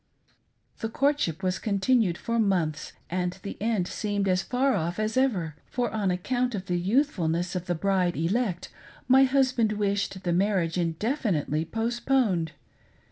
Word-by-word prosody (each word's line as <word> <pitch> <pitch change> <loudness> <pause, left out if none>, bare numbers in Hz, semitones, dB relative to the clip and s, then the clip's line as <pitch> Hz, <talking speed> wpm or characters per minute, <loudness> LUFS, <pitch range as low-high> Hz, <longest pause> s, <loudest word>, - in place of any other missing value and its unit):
The 225 - -3
courtship 230 - 0
was 185 0 0
continued 205 -2 +2
for 230 0 -2
months, 175 -8 0
and 180 0 -1
the 200 - -5
end 215 -5 0
seemed 205 -1 -2
as 185 -1 +2
far 260 +4 +1
off 170 -1 -1
as 215 +1 -1
ever; 195 - +1
for 245 -2 -1
on 210 -3 0
account 245 +7 -1
of 190 -2 -5
the 180 -1 -1
youthfulness 180 - 0
of 180 0 -3
the 175 - 0
bride 185 0 +1
elect 185 +2 -1 0.4
my 265 +1 +7
husband 255 -5 +2
wished 200 -2 -1
the 175 - 0
marriage 180 -3 +1
indefinitely 170 - -1
post 230 +5 -3
poned. 200 - +2
200 Hz, 150 wpm, -27 LUFS, 175-235 Hz, 0.4 s, my